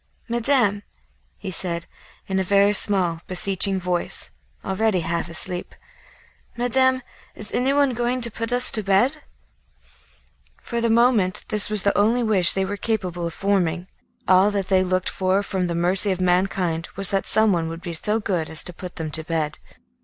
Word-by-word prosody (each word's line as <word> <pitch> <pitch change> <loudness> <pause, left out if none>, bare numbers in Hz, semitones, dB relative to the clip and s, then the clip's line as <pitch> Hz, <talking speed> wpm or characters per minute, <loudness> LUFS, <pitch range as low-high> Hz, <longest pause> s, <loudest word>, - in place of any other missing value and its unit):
"Madame," 235 -4 +1 0.6
he 195 - -7
said, 170 -1 -2 0.4
in 190 0 -2
a - - 0
very 200 +2 +3
small, 185 -5 +2
beseeching 190 +1 +1
voice, 180 -1 -1 0.3
already 190 -1 0
half 170 +1 -3
asleep, 180 +2 -6 0.8
"Madame, 260 +2 +1 0.3
is 210 - -7
anyone 275 +1 +1
going 240 +2 -1
to 235 -1 0
put 230 +2 -3
us 245 0 +4
to 215 - -2
bed?" 220 +10 +1 1.4
For 235 -1 -4
the 230 - 0
moment 225 -5 +2
this 210 -1 +4
was 215 -2 +3
the 200 - +1
only 225 +4 +2
wish 195 -6 +4
they 190 0 -1
were 200 +1 -5
capable 180 -6 -3
of 165 - -8
forming; 185 -3 -1 0.4
all 190 +2 +5
that 200 -2 -3
they 190 -1 +3
looked 185 0 -1
for 190 +1 0
from 190 -2 -2
the 170 - -3
mercy 185 +4 +4
of 185 -1 -1
mankind 180 -2 0
was 195 -1 +7
that 195 -1 -1
someone 190 -7 +1
would 165 +1 -8
be 175 - -6
so 210 +7 -2
good 180 -7 -2
as 160 - -3
to 180 - -6
put 180 +1 -9
them 160 -2 -5
to 160 +1 -1
bed. 155 -2 -3
195 Hz, 170 wpm, -22 LUFS, 180-220 Hz, 1.4 s, was